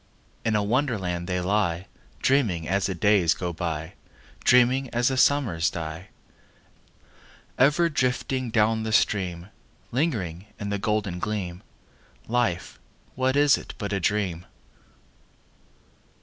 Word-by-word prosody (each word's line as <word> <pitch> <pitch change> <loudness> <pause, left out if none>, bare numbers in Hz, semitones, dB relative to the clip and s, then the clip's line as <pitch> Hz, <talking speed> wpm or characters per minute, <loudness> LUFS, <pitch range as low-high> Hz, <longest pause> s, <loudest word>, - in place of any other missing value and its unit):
In 110 -2 +1
a 105 - +2
Wonderland 100 -8 -1
they 90 -1 -1
lie, 90 -2 0 0.4
Dreaming 110 - +2
as 100 +1 +1
the 95 - -3
days 95 -2 +3
go 90 -2 -4
by, 80 0 -4 0.5
Dreaming 125 +2 +4
as 120 +2 +1
the 130 - -1
summers 125 - +3
die: 80 +2 -6 1.5
Ever 150 +6 +4
drifting 130 -3 -1
down 110 0 +2
the 110 0 -3
stream— 90 -4 +1 0.4
Lingering 105 - -2
in 100 - -4
the 100 - -1
golden 105 -3 -1
gleam— 95 -4 -3 0.7
Life, 110 -7 -1 0.3
what 130 +1 0
is 145 0 +5
it - - -10
but 100 -3 -4
a 100 - 0
dream? 90 -3 -1
105 Hz, 120 wpm, -25 LUFS, 90-125 Hz, 1.5 s, is